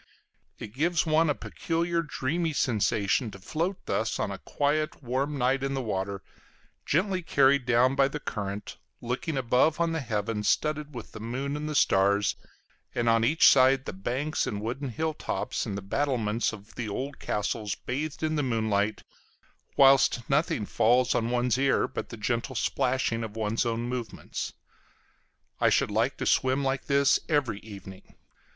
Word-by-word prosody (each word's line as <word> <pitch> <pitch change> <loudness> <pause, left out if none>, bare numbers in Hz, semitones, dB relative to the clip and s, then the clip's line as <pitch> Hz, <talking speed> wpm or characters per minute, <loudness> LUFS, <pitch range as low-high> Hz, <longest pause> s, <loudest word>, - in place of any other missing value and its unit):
It 105 - -8
gives 165 +6 +1
one 160 0 +3
a 145 - +1
peculiar 170 0 -1
dreamy 160 +2 -2
sensation 110 -2 +1
to 100 - -10
float 165 - -3
thus 110 0 -1
on 100 - -1
a 95 - -6
quiet 150 +1 -1
warm 135 +4 -1
night 130 +1 +1
in 135 0 -2
the 135 - -1
water, 100 -2 -3 0.6
gently 185 +4 +1
carried 140 -4 +3
down 125 +2 +4
by 135 0 +4
the 150 +2 -5
current, 100 -5 -5 0.2
looking 125 +6 -3
above 130 +5 +2
on 170 -1 +1
the 165 - -1
heavens 105 -4 -1
studded 150 -2 0
with 120 - -8
the - - -9
moon 130 +6 -3
and 150 0 -2
stars, 100 +1 +3 0.6
and 120 -1 0
on 115 0 +4
each 150 +8 +5
side 135 0 +5
the - - -5
banks 130 +11 -2
and 100 - -3
wooded 125 +6 -4
hill 160 +6 -2
tops - - -3
and 100 - -3
the 100 - -6
battlements 115 -1 0
of 105 0 -12
the 115 -3 -4
old 135 +7 -4
castles 105 0 -2
bathed 145 +8 -4
in 155 0 0
the - - +2
moonlight, 110 -4 0 0.7
whilst 135 -3 +5
nothing 140 -6 +1
falls 120 +4 +3
on 115 0 0
one's 125 0 +1
ear 135 0 +2
but - - -6
the 115 - -8
gentle 120 +4 -2
splashing 125 -2 0
of 110 -1 -7
one's 110 +2 0
own 115 0 -1
movements. 120 -1 -5 1.1
I - - +4
should - - +2
like - - +1
to - - -3
swim 130 +1 +2
like 135 0 -1
this 140 -1 +4
every 145 -9 +1
evening. 95 -3 -12
125 Hz, 165 wpm, -28 LUFS, 110-145 Hz, 1.1 s, each